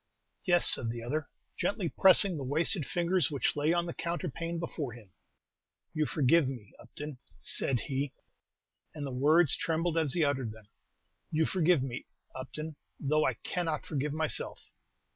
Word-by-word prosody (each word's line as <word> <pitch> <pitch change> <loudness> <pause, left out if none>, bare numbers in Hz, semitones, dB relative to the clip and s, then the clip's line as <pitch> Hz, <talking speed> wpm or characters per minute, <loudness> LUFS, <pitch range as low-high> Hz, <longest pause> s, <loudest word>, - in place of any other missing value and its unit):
"Yes," 175 -3 +6
said 115 - +6
the 115 0 -5
other, 145 +4 -3 0.3
gently 200 -4 -1
pressing 190 +2 +6
the 145 - -5
wasted 155 +4 0
fingers 175 -3 +1
which 140 -5 -1
lay 150 +2 +1
on 175 0 +1
the 170 - -5
counterpane 170 0 -4
before 155 -6 -4
him. 110 -5 -15 0.8
"You 155 -1 0
forgive 150 0 +3
me, 120 -7 -9
Upton," 150 -3 -9 0.2
said 125 - 0
he, 135 0 -3 0.8
and 145 -2 -5
the 135 - -5
words 150 +5 +4
trembled 165 0 0
as 150 -5 -1
he 170 - +2
uttered 130 -6 -1
them, 110 -2 -16 0.6
"You 160 0 +1
forgive 175 -5 +2
me, 130 -2 -6 0.3
Upton, 150 +4 -7 0.2
though 150 +2 +1
I 130 - -1
cannot 160 +4 -3
forgive 145 0 -2
myself." 155 0 -3
150 Hz, 155 wpm, -30 LUFS, 130-170 Hz, 0.8 s, Yes